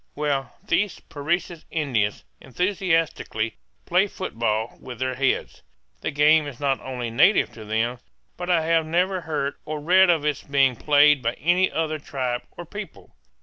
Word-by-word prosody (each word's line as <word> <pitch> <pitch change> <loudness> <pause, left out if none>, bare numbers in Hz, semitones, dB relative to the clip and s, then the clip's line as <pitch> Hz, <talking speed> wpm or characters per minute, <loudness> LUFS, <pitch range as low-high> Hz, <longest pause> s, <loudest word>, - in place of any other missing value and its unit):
Well, 140 -4 -2
these 210 -2 +1
Parecis 165 +3 -3
Indians 120 -10 -1 0.2
enthusiastically 165 - -1 0.3
play 180 +3 +3
football 115 - -3
with 125 -2 -8
their 130 +1 -1
heads. 130 0 -1 0.4
The - - -2
game 150 +1 +4
is 135 -4 -9
not 140 -2 0
only 125 -3 -4
native 180 - +4
to 110 - -10
them, 115 +3 -1 0.4
but 180 0 -6
I 170 -3 +3
have 165 -1 +2
never 180 +3 +1
heard 150 -3 -3
or 155 0 -4
read 185 +5 +5
of 160 -4 +2
its 150 -3 0
being 135 -2 +2
played 145 +2 +4
by 115 -1 0
any 175 +7 +2
other 155 -1 -1
tribe 130 -4 -3 0.2
or - - -7
people. - - -9
145 Hz, 155 wpm, -24 LUFS, 125-165 Hz, 0.4 s, read